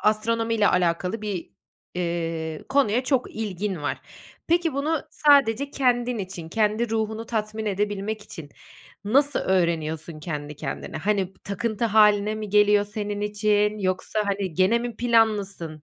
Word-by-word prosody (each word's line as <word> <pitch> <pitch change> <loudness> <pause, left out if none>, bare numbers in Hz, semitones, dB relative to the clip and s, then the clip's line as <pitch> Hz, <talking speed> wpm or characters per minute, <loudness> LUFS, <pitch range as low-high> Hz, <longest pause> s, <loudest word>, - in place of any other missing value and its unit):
astronomiyle 225 0 +2
alakalı 180 +4 0
bir, 200 -5 -4 0.4
eee, 165 -3 -3
konuya 260 -3 +2
çok 260 -2 0
ilgin 200 -5 -3
var. 145 - -2 0.5
Peki, 335 -2 +2
bunu 295 +3 -1
sadece 280 -3 +3
kendin 245 -3 +1
için, 185 -4 -6
kendi 215 +3 0
ruhunu 220 0 -2
tatmin 215 -1 -3
edebilmek 205 +1 -2
için 155 -7 -10 0.6
nasıl 280 +6 +2
öğreniyorsun 160 -3 -1
kendi 150 -2 -5
kendine? 135 -3 -5
Hani, 195 +1 0
takıntı 220 +2 -2
hâline 210 -1 +4
mi 215 -1 -5
geliyor 210 0 +4
senin 205 0 -4
için 210 0 +1
yoksa, 185 +2 -1
hani, 195 -4 -2
gene 190 +6 +3
mi 235 -2 -5
planlısın? 205 -9 +1
210 Hz, 130 wpm, -24 LUFS, 185-225 Hz, 0.6 s, hâline